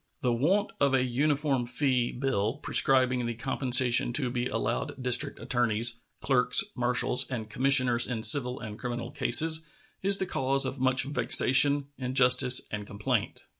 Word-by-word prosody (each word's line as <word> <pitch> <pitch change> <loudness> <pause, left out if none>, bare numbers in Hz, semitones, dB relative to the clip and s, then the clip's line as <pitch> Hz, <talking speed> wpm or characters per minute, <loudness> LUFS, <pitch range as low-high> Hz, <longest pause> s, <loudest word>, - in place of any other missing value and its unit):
The 125 -2 -1
want 185 - -1
of 140 -1 +1
a 130 - 0
uniform 140 +1 -2
fee 125 -1 -2
bill, 120 -5 -3
prescribing 130 -3 0
the 120 - -6
compensation 125 -1 +1
to 125 -1 +1
be 125 0 -4
allowed 145 - -4
district 125 -1 -1
attorneys, 115 -1 0 0.2
clerks, 125 -2 +1
marshals, 125 +1 -1
and 110 -4 -7
commissioners 130 -2 +3
in 115 -3 -6
civil 125 -3 +4
and 110 -1 -10
criminal 120 -1 -7
cases, 160 +5 +3 0.4
is 195 +1 +2
the 190 - -4
cause 135 -4 0
of 130 +1 -6
much 130 0 +1
vexation, 140 +1 +3
injustice, 125 0 +3
and 105 -1 -7
complaint. 100 +1 -5
125 Hz, 145 wpm, -26 LUFS, 120-135 Hz, 0.4 s, civil